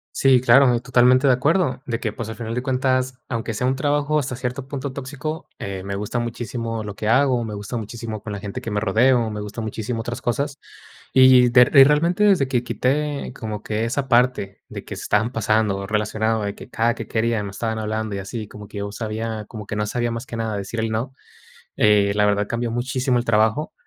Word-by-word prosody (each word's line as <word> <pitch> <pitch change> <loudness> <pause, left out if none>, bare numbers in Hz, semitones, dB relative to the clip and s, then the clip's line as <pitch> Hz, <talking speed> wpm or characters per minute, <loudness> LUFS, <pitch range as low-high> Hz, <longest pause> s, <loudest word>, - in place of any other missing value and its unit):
Sí, 135 -2 +5
claro, 125 +1 +6
y - - 0
totalmente 125 +1 +4
de 130 - +6
acuerdo 135 0 +1
de 115 -1 -2
que, 110 -3 -3
pues, 110 0 -6
al 110 - -6
final 115 -1 -5
de 125 - -1
cuentas, 130 0 0
aunque 115 -2 -3
sea 125 - -1
un 130 +1 +1
trabajo 145 +2 +1
hasta 130 -2 -3
cierto 130 +1 -4
punto 135 -1 -5
tóxico, 145 +3 -6
eh, 95 -1 -5
me 100 0 -4
gusta 105 +4 -3
muchísimo 115 -1 -4
lo 105 -1 -7
que 105 - -4
hago, 125 0 +3
me 110 -2 -5
gusta 105 +4 -5
muchísimo 110 -1 -6
con 105 - -7
la 100 - -4
gente 100 -1 -6
que 115 - -5
me 105 - 0
rodeo, 115 +2 +3
me 105 - -5
gusta 105 +2 -6
muchísimo 110 +2 -4
otras 120 +2 -5
cosas. 140 +4 -2 0.5
Y 130 -2 +7
de 125 +1 +6
eh, 135 +2 +8
realmente 170 +8 +3
desde 185 -10 +4
que 125 -2 0
quité 140 +2 -1
como 105 -2 -5
que 110 +1 -1
esa 135 +3 -2
parte, 120 -5 +1
de - - -8
que - - -6
se - - -7
estaban 110 +4 +1
pasando, 110 -3 +1
o 100 - -6
relacionado 110 +1 0
de 100 0 -2
que - - -12
cada 115 +1 +1
que - - -7
quería 115 -1 0
me 100 - -5
estaban 110 +2 -3
hablando, 110 -1 -3
y 100 - -3
así, 105 +2 -6
como 105 -1 -11
que 105 - -10
yo 100 0 -4
sabía, 110 0 -4
como 110 -3 -8
que 105 - -5
no 105 0 -1
sabía 120 +1 -1
más 115 +2 -5
que 115 - -6
nada 110 -2 -2
decir 100 +4 -5
el 110 0 -1
no. 115 +4 -3 0.6
Eh, 105 -1 +4
la 105 0 +3
verdad, 105 0 +2
cambió 115 0 -2
muchísimo 125 +1 0
el 120 - -4
trabajo 110 +6 +1
115 Hz, 230 wpm, -22 LUFS, 110-130 Hz, 0.6 s, eh